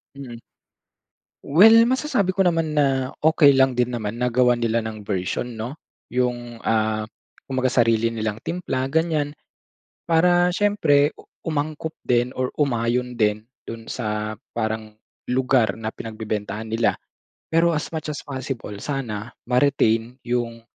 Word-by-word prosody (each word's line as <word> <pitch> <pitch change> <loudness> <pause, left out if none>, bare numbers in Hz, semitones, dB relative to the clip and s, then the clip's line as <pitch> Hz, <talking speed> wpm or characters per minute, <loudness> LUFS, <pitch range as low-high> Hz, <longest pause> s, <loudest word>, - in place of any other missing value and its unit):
Mhm, 130 -4 -8 1.1
well 205 +10 +7
masasabi 250 -8 0
ko 195 - +3
naman 165 -3 +1
na 135 -3 +2 0.2
okey 145 -3 +6
lang 130 -1 +4
din 125 0 0
naman 110 +1 -4
na 125 - +2
gawan 125 0 +3
nila 115 -1 0
ng 110 -1 -6
version, 95 +4 -2
'no. 120 +6 -5 0.4
Yung, 120 -2 -2
ah, 110 -1 0 0.4
kumbaga 130 -1 0
sarili 115 -1 +3
nilang 110 -2 -2
timpla 165 -7 -2
ganyan 155 -2 +1 0.7
para 175 +2 +4
siyempre, 155 -9 +3
u - - -15 0.2
umangkop 155 +1 -3
din 120 0 +2
or 130 0 -1
umayon 125 -2 0
din 105 -1 +1 0.2
dun 115 -1 -8
sa 110 -2 -3 0.2
parang 110 -1 -3 0.4
lugar 125 -4 +2
na 110 -1 -3
pinagbebentahan 110 -1 -5
nila. 115 +1 +2 0.6
Pero 165 +1 +4
as 150 - -2
much 155 -1 -4
as 145 - -4
possible 130 -6 -5
sana, 115 -3 -4 0.2
ma-retain 125 -2 +2
yung, 120 -1 -2
125 Hz, 135 wpm, -23 LUFS, 110-145 Hz, 1.1 s, well